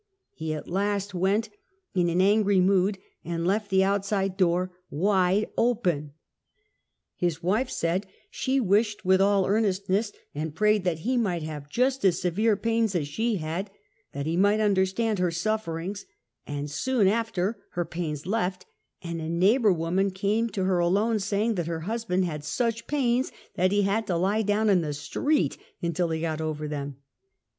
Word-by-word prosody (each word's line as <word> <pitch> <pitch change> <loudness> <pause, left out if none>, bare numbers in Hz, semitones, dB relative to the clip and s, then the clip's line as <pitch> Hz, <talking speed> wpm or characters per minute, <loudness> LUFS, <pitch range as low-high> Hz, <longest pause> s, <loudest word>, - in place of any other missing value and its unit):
He 160 0 -4
at 150 - -7
last 200 +2 -1
went 195 +5 +1 0.4
in 175 -3 +2
an 175 +2 +2
angry 205 0 +4
mood 190 +1 +3 0.3
and 170 0 -3
left 205 +3 0
the 190 -1 +4
out 200 0 +1
side 195 -2 -1
door 180 -1 +1 0.2
wdde 190 +4 +2
open. 180 -12 0 1.0
His 170 -2 -1
wife 215 +9 +1
said 180 +4 -1 0.2
she 265 +1 0
wished 210 -1 +1
with 190 +1 +4
all 200 -1 +3
earnestness 200 0 +1 0.2
and 155 +1 -4
pra^^ed 210 +2 +3
that 175 -3 +1
he 250 +6 0
might 180 -8 0
have 150 -2 -6
just 260 - +1
as 180 -4 +3
severe 205 +4 +1
pains 225 -2 0
as 155 -5 0
she 220 +9 -1
had, 170 +3 -3 0.4
that 140 - -4
he 160 +2 -1
might 205 +4 +3
understand 205 +1 +1
her 180 -1 +2
sufferings; 180 +1 -3 0.4
and 145 0 -4
soon 245 - +1
after 205 -3 +1
all 215 -2 -9
her 175 -1 -1
pains 155 -4 -4
left, 185 -2 -1 0.4
and 170 -1 -4
a 160 - -4
neighbor 200 +7 +4
woman 180 +3 +1
came 205 +5 0
to 195 -3 -2
her 185 -1 +2
alone, 205 +6 +2
saying 205 +3 0
that 175 -5 -2
her 165 -1 -3
husband 195 -1 -1
had 150 -4 -4
such 230 +7 -1
pains 255 -3 +1 0.2
that 185 +1 +2
he 205 0 +3
had 205 +3 0
to 175 - 0
lie 195 +5 +1
down 210 +1 +1
in 190 -4 +4
the 150 -3 -3
street 290 - 0 0.2
until 170 0 -1
he 160 0 -2
got 160 -1 -2
over 155 -1 -3
them. 145 -2 -4
190 Hz, 170 wpm, -26 LUFS, 170-215 Hz, 1.0 s, angry